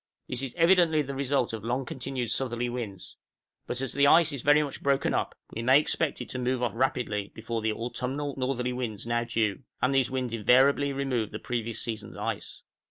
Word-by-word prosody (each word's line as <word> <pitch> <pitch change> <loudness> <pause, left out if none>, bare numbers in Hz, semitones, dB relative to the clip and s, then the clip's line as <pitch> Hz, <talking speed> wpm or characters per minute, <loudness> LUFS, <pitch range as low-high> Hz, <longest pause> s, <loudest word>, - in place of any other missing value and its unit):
This 125 0 -2
is 135 -3 -5
evidently 165 -3 +4
the 140 0 -5
result 135 -3 0
of 110 -2 -5
long 125 +3 -1
continued 125 -2 -3
southerly 120 -1 -1
winds; 115 -6 -6 0.5
but 125 +1 -2
as 135 - -2
the 140 +1 +4
ice 160 0 +6
is 140 - -4
very 145 +2 +5
much 140 - -6
broken 140 0 +1
up, - - -1 0.2
we 115 - -3
may 130 +4 +6
expect 155 0 -1
it 125 - -7
to 130 - -4
move 125 0 0
off 120 - +1
rapidly 115 -5 -1
before 115 +1 -3
the 110 0 +1
autumnal 125 +5 -3
northerly 125 -1 -1
winds 115 -5 -4
now 120 0 0
due, 110 -1 0 0.2
and 130 +2 +2
these 135 -2 +3
winds 130 -3 -2
invariably 135 +5 +4
remove 135 -6 -1
the 110 - -5
previous 115 -1 -3
season's 110 -3 -5
ice. - - -4
125 Hz, 200 wpm, -28 LUFS, 115-140 Hz, 0.5 s, ice